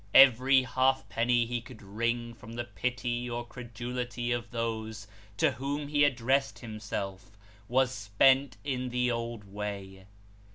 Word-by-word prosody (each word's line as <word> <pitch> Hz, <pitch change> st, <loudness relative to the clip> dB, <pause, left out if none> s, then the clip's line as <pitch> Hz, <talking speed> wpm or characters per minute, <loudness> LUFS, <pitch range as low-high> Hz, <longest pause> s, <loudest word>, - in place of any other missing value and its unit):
Every 130 Hz, 0 st, +8 dB
halfpenny 125 Hz, -2 st, +2 dB
he 120 Hz, 0 st, -2 dB
could 115 Hz, -1 st, -13 dB
wring 115 Hz, +4 st, -2 dB
from 115 Hz, -1 st, -12 dB
the 120 Hz, +1 st, -3 dB
pity 120 Hz, +3 st, -2 dB
or 120 Hz, 0 st, -3 dB
credulity 120 Hz, +1 st, -4 dB
of 120 Hz, -1 st, -2 dB
those 110 Hz, -2 st, -3 dB, 0.3 s
to -, -, +4 dB
whom 140 Hz, +2 st, -3 dB
he 145 Hz, -1 st, +3 dB
addressed 135 Hz, 0 st, +2 dB
him 110 Hz, -3 st, -8 dB
self, 100 Hz, -1 st, -5 dB, 0.3 s
was 130 Hz, +1 st, +3 dB
spent 130 Hz, +6 st, +3 dB
in 130 Hz, -3 st, -2 dB
the 125 Hz, 0 st, +1 dB
old 115 Hz, -2 st, -3 dB
way. 100 Hz, -1 st, -6 dB
120 Hz, 135 wpm, -30 LUFS, 110-125 Hz, 0.3 s, Every